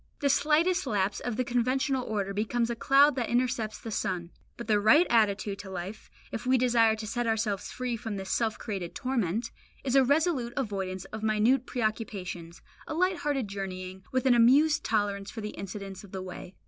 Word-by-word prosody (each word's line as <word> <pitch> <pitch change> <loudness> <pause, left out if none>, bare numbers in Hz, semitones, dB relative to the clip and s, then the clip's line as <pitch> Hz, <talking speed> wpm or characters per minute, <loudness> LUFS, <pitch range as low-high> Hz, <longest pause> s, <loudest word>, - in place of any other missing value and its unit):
The 285 - +1
slightest 320 +6 +2
lapse 200 -1 0
of 245 -3 -3
the 255 - +1
conventional 255 +2 0
order 200 -3 -2
becomes 230 +3 0
a - - -2
cloud 280 +5 +5
that 245 - -1
intercepts 240 -3 0
the 225 - -8
sun. 180 -5 -2 0.3
But 235 - -6
the 210 -1 +3
right 220 +12 +6
attitude 205 -3 +2
to 200 -1 -8
life, 190 +3 -7 0.2
if 225 - -4
we 260 0 +5
desire 235 -3 +4
to 215 0 -6
set 240 +2 -2
ourselves 215 -3 -1
free 250 -1 -3
from 225 -2 -5
this 190 -1 -5
self 225 -2 0
created 190 -5 -5
torment, 230 -4 -1 0.3
is 265 -1 0
a 270 - +7
resolute 280 -3 +1
avoidance 190 -7 -3
of 220 - -5
minute 220 +4 +2
preoccupations, 205 -8 -4 0.2
a 310 - -4
light 365 +2 +2
hearted 280 -7 -1
journeying, 190 -1 -6
with 260 0 0
an 260 - +6
amused 275 +7 +5
tolerance 200 -2 -1
for 225 - -7
the 210 - -4
incidents 195 0 -7
of 200 - -14
the 190 -1 -4
way. 185 0 -9
225 Hz, 190 wpm, -29 LUFS, 200-255 Hz, 0.3 s, a